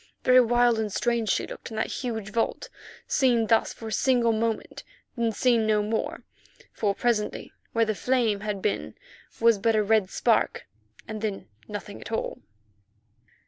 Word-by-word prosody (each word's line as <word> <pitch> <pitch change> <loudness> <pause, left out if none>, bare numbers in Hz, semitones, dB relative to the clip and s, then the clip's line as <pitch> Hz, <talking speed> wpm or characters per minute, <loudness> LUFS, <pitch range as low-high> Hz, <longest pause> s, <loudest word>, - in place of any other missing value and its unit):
Very 255 0 +7
wild 240 -1 +3
and 215 -2 -2
strange 235 0 0
she - - +1
looked - - -9
in 220 - -8
that - - +1 0.2
huge 220 -5 -4
vault, 235 - -1 0.4
seen 245 -5 +2
thus 225 0 +2
for 225 - -8
a - - -8
single 240 -1 +2
moment, 225 0 -2 0.3
then 235 -2 0
seen 230 -1 +2
no 210 -1 +2
more, 220 +1 -2 0.5
for 200 -2 0
presently 230 -3 -1 0.2
where 230 0 +3
the 215 - 0
flame 230 -2 +1
had 205 -2 -4
been 210 - -2 0.4
was 230 -2 +4
but 225 +2 +2
a 215 - +3
red 210 -2 +2
spark, - - +1 0.4
and 215 -1 -6
then 210 -3 -3 0.2
nothing 205 -1 -7
at - - -9
all. 225 - -3
225 Hz, 165 wpm, -26 LUFS, 215-235 Hz, 0.5 s, Very